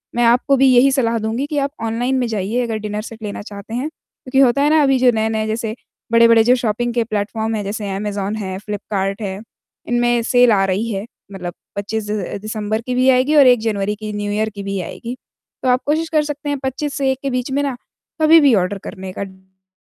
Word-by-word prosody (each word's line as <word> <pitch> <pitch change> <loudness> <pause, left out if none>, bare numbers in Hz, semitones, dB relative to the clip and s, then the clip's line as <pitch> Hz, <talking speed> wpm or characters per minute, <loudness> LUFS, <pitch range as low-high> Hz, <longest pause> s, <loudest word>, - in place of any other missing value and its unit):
मैं 240 - +2
आपको 250 +4 +3
भी 270 +1 +5
यही 270 +3 +6
सलाह 235 -4 +1
दूँगी 225 +5 -2
कि 295 0 -3
आप 280 0 0
ऑनलाइन 240 +4 0
में 245 - 0
जाइए, 220 +2 -1
अगर 225 -2 -2
डिनर 210 0 -4
सेट 225 0 -10
लेना 205 - -5
चाहते 205 +1 -9
हैं, 255 +5 -1
क्योंकि 265 -4 -5
होता 270 +1 +4
है 290 - +4
ना, 315 0 +4
अभी 270 -1 +3
जो 250 -1 +5
नए-नए, 220 0 0
जैसे 220 0 -3 0.4
बड़े-बड़े, 230 -1 +6
जो 245 +3 +5
शॉपिंग 240 0 -1
के 235 -1 +1
प्लेटफ़ॉर्म 220 +1 -2
हैं, 205 - -2
जैसे 205 +1 -4
अमेज़न 205 0 -3
है, 190 -2 -4
फ़्लिपकार्ट 200 -1 -3
है, 195 -2 -4 0.5
इनमें 240 0 +2
सेल 245 0 +4
आ 195 -2 +3
रही 200 +5 -1
है। 195 +1 -3 0.3
मतलब 180 -3 -6 0.2
25 205 +1 -3
अ, 205 -3 -3
दिसम्बर 215 0 -3
की 250 +1 -3
भी 255 +1 +3
आएगी 260 +4 +3
और 280 -3 +7
1 245 -2 +6
जनवरी 210 -2 -1
की, 215 0 -6
न्यू 205 0 -3
ईयर 215 +1 0
की 200 - -6
भी 195 0 -3
आएगी। 235 +8 -6 0.5
तो 255 - +2
आप 250 +1 +3
कोशिश 315 +2 0
कर 310 -1 +2
सकते 295 0 -5
हैं, 285 - -1
25 270 +2 -3
से 275 -2 +1
1 265 - -3
के 275 - 0
बीच 250 +1 -2
में 280 +2 +1
ना, 275 -3 -2 0.5
कभी 315 +1 +7
भी 285 -5 +5
ऑर्डर 195 +1 0
करने 185 0 -7
का। - - -4
डिनर 190 0 -16
225 Hz, 230 wpm, -19 LUFS, 205-255 Hz, 0.5 s, और